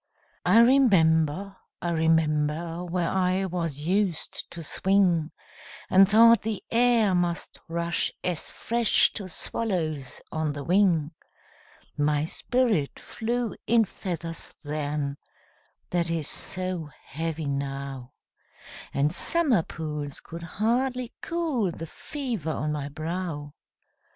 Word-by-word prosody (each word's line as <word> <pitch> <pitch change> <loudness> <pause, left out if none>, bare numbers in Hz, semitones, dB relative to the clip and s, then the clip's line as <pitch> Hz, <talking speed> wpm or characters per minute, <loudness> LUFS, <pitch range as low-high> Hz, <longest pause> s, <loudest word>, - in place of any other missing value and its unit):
I - - +6
remember, 195 - +4 0.2
I 175 - -2
remember, 160 +1 +1
Where 175 -1 -1
I 190 0 +1
was 165 -6 -3
used 185 +1 -1
to 170 - -7
swing, 180 -2 +2 0.6
And 190 +1 +7
thought 230 +1 +7
the 215 -2 -3
air 235 -4 +4
must 175 -1 -1
rush 170 0 0
as 175 -3 -2
fresh 235 0 +2
To 195 -3 -5
swallows 160 - -2
on 155 -2 -1
the 145 0 -6
wing; 170 -3 +3 0.8
My 150 0 +1
spirit 220 - 0
flew 235 0 -3
in 230 -1 +5
feathers 170 -3 -5
then, 145 -1 -2 0.7
That 170 -1 +1
is 165 -3 -1
so 185 -4 -1 0.2
heavy 160 +1 -4
now, 140 -2 -4 0.8
And 145 +3 +2
summer 285 - +2
pools 150 -3 -5
could 170 +1 -9
hardly 240 +7 -1
cool 315 - 0
The 165 - -7
fever 235 - -5
on 150 -1 -1
my 145 -1 -3
brow! 155 -1 -4
170 Hz, 110 wpm, -26 LUFS, 150-205 Hz, 0.8 s, And